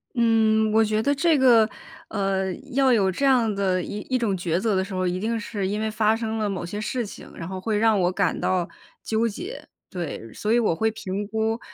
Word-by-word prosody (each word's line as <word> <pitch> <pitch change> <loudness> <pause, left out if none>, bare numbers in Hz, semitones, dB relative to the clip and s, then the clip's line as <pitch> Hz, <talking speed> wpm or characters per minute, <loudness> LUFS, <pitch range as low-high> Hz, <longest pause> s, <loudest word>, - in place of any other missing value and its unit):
嗯， 220 -2 +3
我 225 - +5
觉 215 0 +1
得 285 - +2
这 315 +1 +3
个， 235 -4 +5 0.4
呃， 195 -2 -1 0.2
要 270 -1 +4
有 195 -5 +3
这 275 +10 -1
样 245 -5 +3
的 190 -2 0
一 205 - -5
一 260 - +2
种 225 -5 0
抉 175 -1 -1
择 215 0 0
的 190 - +1
时 195 +1 -8
候， 185 0 -1
一 180 +1 -1
定 225 +2 -1
是 205 -2 -3
因 205 +2 -2
为 220 0 -1
发 215 0 +2
生 225 -1 -3
了 210 -1 0
某 185 -3 -3
些 205 +4 -5
事 240 +2 -2
情， 205 - -11
然 165 - -6
后 190 0 -5
会 215 -1 0
让 220 -1 +3
我 180 0 +2
感 185 -3 0
到 180 -2 0 0.4
纠 225 +1 +1
结。 355 - -7 0.2
对， 160 -10 -6
所 210 - -2
以 240 - +4
我 210 -8 +1
会 220 +3 +1
评 205 -1 -4
估， 220 +1 -1
215 Hz, 245 characters per minute, -24 LUFS, 190-225 Hz, 0.4 s, 我